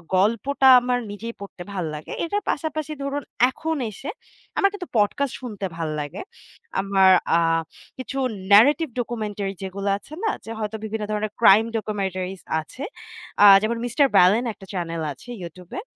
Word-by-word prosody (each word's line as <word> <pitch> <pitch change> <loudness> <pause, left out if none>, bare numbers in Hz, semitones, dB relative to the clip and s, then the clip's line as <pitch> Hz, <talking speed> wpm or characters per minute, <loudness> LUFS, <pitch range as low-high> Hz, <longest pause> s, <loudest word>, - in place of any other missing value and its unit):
গল্পটা 230 +8 +2
আমার 245 0 0
নিজেই 230 +3 -6
পড়তে 190 -3 -8
ভাল 180 -4 -2
লাগে। 150 - -9
এটার 410 +5 -1
পাশাপাশি 310 0 -2
ধরুন 280 +1 -3 0.3
এখন 320 +4 -3 0.2
এসে 275 +9 -8 0.5
আমার 395 - +4
কিন্তু 370 -4 -6
podcast 245 +6 +1
শুনতে 210 -6 -5
ভাল্লাগে। 155 - -4 0.6
আমার 195 -1 +4 0.3
আ - - +3 0.6
কিছু 260 +1 -6 0.3
narrative 285 +7 +6
documentary 210 -4 -3
যেগুলো 195 +1 -3
আছে 280 +9 -15
না 440 - +2 0.2
যে 225 - -7
হয়তো 215 0 -3
বিভিন্ন 220 0 -3
ধরনের 210 0 -2
crime 220 +1 +7
documentaries 190 -3 -3 0.2
আছে। 255 - -10 0.6
আ - - +9 0.2
যেমন 230 +2 -1
'mister 245 +4 +2
Ballon' 210 +7 +5
একটা 195 - -14
channel 165 -2 -3
আছে 190 - -16
YouTube 175 +1 -11
এ। - - -5
215 Hz, 150 wpm, -23 LUFS, 195-265 Hz, 0.6 s, আ